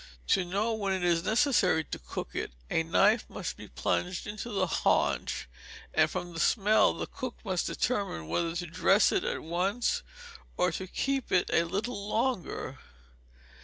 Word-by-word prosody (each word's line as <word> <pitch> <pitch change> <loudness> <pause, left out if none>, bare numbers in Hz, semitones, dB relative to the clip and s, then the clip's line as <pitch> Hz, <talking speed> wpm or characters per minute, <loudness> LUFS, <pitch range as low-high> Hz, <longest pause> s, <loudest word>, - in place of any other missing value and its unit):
To 190 - +4
know 200 +6 0
when 200 -3 -1
it 185 -1 -2
is 170 -1 +2
necessary 215 - +3
to - - -6
cook - - -6
it, - - -3 0.2
a - - +3
knife 200 +7 +3
must - - -5
be - - -10
plunged 180 0 -1
into 215 +3 -5
the 195 -4 +1
haunch; 170 - +1 0.5
and 155 0 +4
from 175 +1 -5
the 165 - -5
smell 210 +5 +4
the - - -3
cook 255 -2 -6
must 185 -3 0
determine 200 - -1
whether 165 - -1
to 175 +1 -2
dress 190 +4 +4
it - - +1
at - - -2
once, 185 +8 0 0.6
or 180 0 +2
to 190 +3 -5
keep 270 +6 -1
it 180 - +2
a 165 - +4
little 200 +4 -3
longer. 235 -4 -1
190 Hz, 165 wpm, -30 LUFS, 170-215 Hz, 0.6 s, To